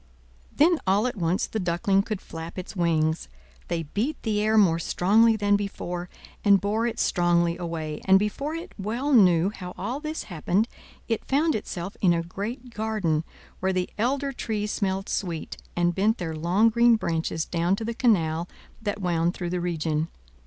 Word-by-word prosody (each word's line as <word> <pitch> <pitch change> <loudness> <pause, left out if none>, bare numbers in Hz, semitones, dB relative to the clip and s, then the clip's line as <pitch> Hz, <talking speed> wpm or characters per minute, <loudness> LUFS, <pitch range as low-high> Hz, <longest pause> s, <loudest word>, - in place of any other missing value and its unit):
Then 330 +2 +4
all 200 +4 +3
at 250 - -1
once 175 -1 0
the 220 - -4
Duckling 180 +2 +2
could 210 -1 -4
flap 165 +2 -8
its 185 +3 -6
wings: 160 -2 +1 0.4
they 165 -1 -1
beat 220 - -2
the 210 -2 0
air 215 +1 +2
more 170 -6 +5
strongly 220 +7 +4
than 205 -1 +2
before, 180 -3 -4 0.3
and 200 -2 +6
bore 215 +4 0
it 235 -1 -4
strongly 170 -1 +2
away; 165 -3 -4
and 190 0 +7
before 275 +10 -2
it 340 +3 -7
well 235 +9 -1
knew 185 -5 +5
how 180 -4 -8
all 235 +9 -3
this 310 +1 -4
happened, 185 +4 0 0.4
it 225 -2 -1
found 305 +4 +2
itself 190 -2 -4
in 180 -3 +5
a 165 - -1
great 230 +8 -6
garden, 210 -8 0 0.4
where 190 +1 +1
the 185 -1 -1
elder 275 +4 0
trees 210 -4 -2
smelled 195 0 -1
sweet, 170 -5 -3 0.2
and 175 0 +2
bent 210 +5 +2
their 165 -3 -4
long 180 +8 +3
green 235 +1 +5
branches 165 -5 -1
down 175 +2 +1
to 220 - -5
the 235 - -2
canal 175 -9 +1 0.3
that 205 -1 -3
wound 170 -1 +1
through 175 -2 -4
the 180 -1 -1
region. 160 -2 -1
195 Hz, 175 wpm, -26 LUFS, 170-220 Hz, 0.4 s, and